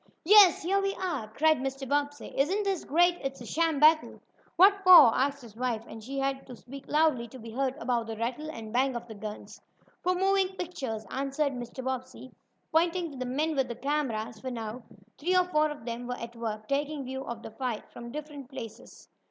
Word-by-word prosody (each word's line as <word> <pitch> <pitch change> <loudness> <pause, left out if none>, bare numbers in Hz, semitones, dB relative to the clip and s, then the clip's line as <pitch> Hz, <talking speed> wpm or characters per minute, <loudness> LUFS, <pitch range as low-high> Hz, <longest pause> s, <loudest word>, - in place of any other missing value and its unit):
"Yes, 395 -2 +7
here 390 +3 +2
we 390 0 -1
are!" 340 -12 -3
cried 310 +7 +2
Mr. 270 0 -4
Bobbsey. 290 +1 -2
"Isn't 365 +10 +1
this 390 -4 -1
great? 350 +3 +3
It's 270 0 -4
a 240 - -9
sham 325 +1 0
battle." 310 +1 +4 0.4
"What 395 +2 +6
for?" 350 -11 +9
asked 280 0 0
his 220 -3 -13
wife, 235 -2 -2
and 225 - -10
she 270 +4 -6
had 270 0 -2
to 250 - -9
speak 275 +4 -11
loudly 300 -6 +2
to 260 - -12
be 225 -2 -9
heard 265 +2 -1
above 235 -1 -1
the 225 -1 -5
rattle 250 +7 -3
and 225 -7 -8
bang 260 +1 +2
of 240 0 -5
the 225 - -8
guns. 210 0 -8 0.4
"For 365 +1 +1
moving 385 0 +2
pictures," 265 - -5
answered 275 +2 -1
Mr. 245 +1 -7
Bobbsey, 260 0 -5 0.4
pointing 335 +1 +1
to 275 - -10
the 255 - -3
men 310 +4 0
with 270 -2 +1
the 235 - -5
cameras, 240 -6 -2
for 260 - -5
now 230 0 -5 0.4
three 360 +5 +2
or 365 - +4
four 305 -3 +2
of 290 -6 -8
them 240 +1 -5
were 250 0 -3
at 235 +1 -8
work, 215 -2 -5
taking 285 +1 -1
views 265 +1 -6
of 235 0 -6
the - - -8
"fight" 240 -1 -4
from 235 0 -9
different 290 -2 -8
places. 230 -5 -10
270 Hz, 210 wpm, -29 LUFS, 235-310 Hz, 0.4 s, for